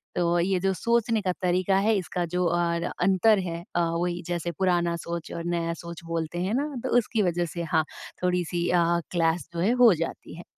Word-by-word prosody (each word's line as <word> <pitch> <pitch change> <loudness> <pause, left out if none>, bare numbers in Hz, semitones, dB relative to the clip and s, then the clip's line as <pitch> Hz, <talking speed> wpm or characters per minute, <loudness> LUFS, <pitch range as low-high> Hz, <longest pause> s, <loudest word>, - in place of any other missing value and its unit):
तो 175 0 +2
ये 185 +2 +1
जो 195 +1 +1
सोचने 230 +3 +1
का 185 -3 0
तरीका 185 +1 +2
है, 220 +3 +3
इसका 180 -1 -2
जो 180 0 +1
अर 170 0 +1 0.2
अंतर 195 +3 +4
है। 170 -2 -4
अ, 175 - +3
वही 175 +1 -1
जैसे 175 -1 -2
पुराना 175 -2 +2
सोच 170 -1 -5
और 170 - -4
नया 170 0 -1
सोच 170 0 -8
बोलते 165 0 -3
हैं 195 - -1
ना, 275 +4 +1 0.2
तो - - -2
उसकी 230 -2 +1
वजह 175 -1 0
से 170 - -2
हाँ, 160 - +4 0.4
थोड़ी-सी 175 -1 0
अ, 175 -1 +4 0.3
क्लैश 165 -1 +1
जो 170 - -4
है 190 +7 +2
हो 230 -5 +8
जाती 165 -1 -5
है। 175 - -9
175 Hz, 205 wpm, -26 LUFS, 170-190 Hz, 0.4 s, हो